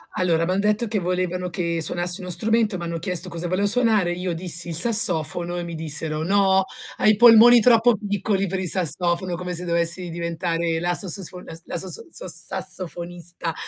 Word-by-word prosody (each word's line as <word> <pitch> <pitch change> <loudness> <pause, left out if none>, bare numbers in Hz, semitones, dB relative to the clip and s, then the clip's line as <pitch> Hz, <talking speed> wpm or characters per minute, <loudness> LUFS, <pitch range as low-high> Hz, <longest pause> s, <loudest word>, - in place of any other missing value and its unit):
A - - -2
allora, 165 -2 +1
m'han 185 +2 -1
detto 210 +3 0
che 210 0 -2
volevano 180 0 -3
che 170 -2 -3
suonassi 175 +3 +1
uno 180 - -8
strumento, 220 0 0
m'hanno 170 -1 -5
chiesto 180 +1 -1
cosa 170 +1 -5
volevo 185 +3 0
suonare, 215 -5 +3
io 180 0 -4
dissi 170 0 +1
il 165 - -2
sassofono 175 -4 +3
e 175 - -4
mi 170 -1 -7
dissero: 155 0 -2
"No, 190 0 +2 0.3
hai 215 - +4
i - - +1
polmoni 235 +1 +7
troppo 230 0 +4
piccoli 200 -1 -2
per 190 +1 -3
il 185 - -2
sassofono", 175 +1 0
come 180 +1 -6
se 175 +1 -4
dovessi 170 +1 0
diventare 170 0 -3
la 175 +1 -1
sasosfo 185 -1 -3
la - - -11
s 165 - -12
la - - -5
sosso 185 - -6
so - - -7
sassofonista, 175 -1 -5
180 Hz, 190 wpm, -22 LUFS, 170-200 Hz, 0.3 s, polmoni